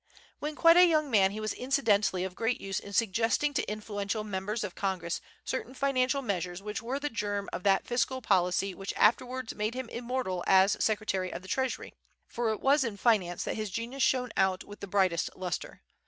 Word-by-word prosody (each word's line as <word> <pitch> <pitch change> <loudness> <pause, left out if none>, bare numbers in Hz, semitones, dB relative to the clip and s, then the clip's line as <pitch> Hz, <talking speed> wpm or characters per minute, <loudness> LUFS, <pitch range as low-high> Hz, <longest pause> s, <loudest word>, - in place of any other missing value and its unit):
When 300 +1 -4
quite 330 +2 +6
a 360 0 +8
young 305 -4 +2
man 195 -4 +5
he 205 +2 -6
was 215 0 -2
incidentally 220 -8 +1
of 190 -1 -4
great 225 +5 -1
use 195 -1 -3
in 200 - -10
suggesting 225 +7 +1
to 255 - -1
influential 210 0 -3
members 210 +2 -3
of 195 -4 -4
Congress 185 -4 -2 0.2
certain 260 0 -4
financial 275 0 +1
measures 180 -5 -2
which 210 +4 -5
were 250 +4 -3
the 295 - -2
germ 205 -3 -2
of - - -3
that 195 -1 +3
fiscal 255 +2 0
policy 190 -3 +1
which 195 +1 -6
afterwards 250 +2 +2
made 215 +3 -2
him 255 -2 -5
immortal 235 -7 -3
as 190 +2 +5
Secretary 205 -4 0
of 180 - -6
the - - -11
Treasury; 260 +5 -2 0.3
for 235 -1 -2
it 220 - -2
was 280 +1 +4
in 225 -5 -3
finance 195 -6 +2
that - - -2
his 215 -1 -3
genius 235 +7 -4
shone 250 -3 +2
out 190 -1 +2
with 205 - -12
the 200 - -7
brightest 185 -3 +1
lustre. 180 -1 -5
215 Hz, 200 wpm, -30 LUFS, 195-255 Hz, 0.3 s, a